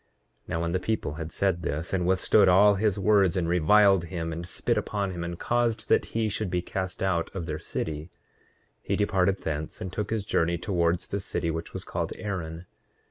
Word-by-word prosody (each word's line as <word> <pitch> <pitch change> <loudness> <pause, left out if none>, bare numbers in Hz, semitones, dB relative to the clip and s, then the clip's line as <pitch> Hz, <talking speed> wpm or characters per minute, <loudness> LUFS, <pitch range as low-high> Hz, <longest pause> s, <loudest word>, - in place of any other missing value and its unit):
8:13 - - -17
Now 85 - -1
when 85 - -1
the 90 - +1
people 110 -7 -2
had 80 0 -5
said 95 -1 0
this, 80 +3 -3
and 90 -2 +1
withstood 95 +2 +4
all 100 +3 +6
his 105 0 +1
words, 100 -2 +3
and 85 -2 0
reviled 95 +2 +5
him, 85 -1 -4
and 85 +2 -6
spit - - -1
upon 100 -2 -1
him, 85 -2 -5
and 85 0 -4
caused 120 +1 0
that - - +4
he 115 -1 -1
should 105 -1 -2
be 90 -1 -1
cast 95 0 -4
out 90 -3 0
of 90 -4 -3
their 80 -1 -4
city, 80 0 -4 0.7
he - - -1
departed 100 -2 +2
thence 75 0 -4
and 95 -1 -6
took 105 -1 -3
his 110 -3 -2
journey 85 -3 +1
towards 85 -2 0
the 100 - -2
city 85 -3 -2
which 80 +1 -5
was - - -6
called - - -3
Aaron. 85 -4 -5
90 Hz, 205 wpm, -27 LUFS, 85-100 Hz, 0.7 s, all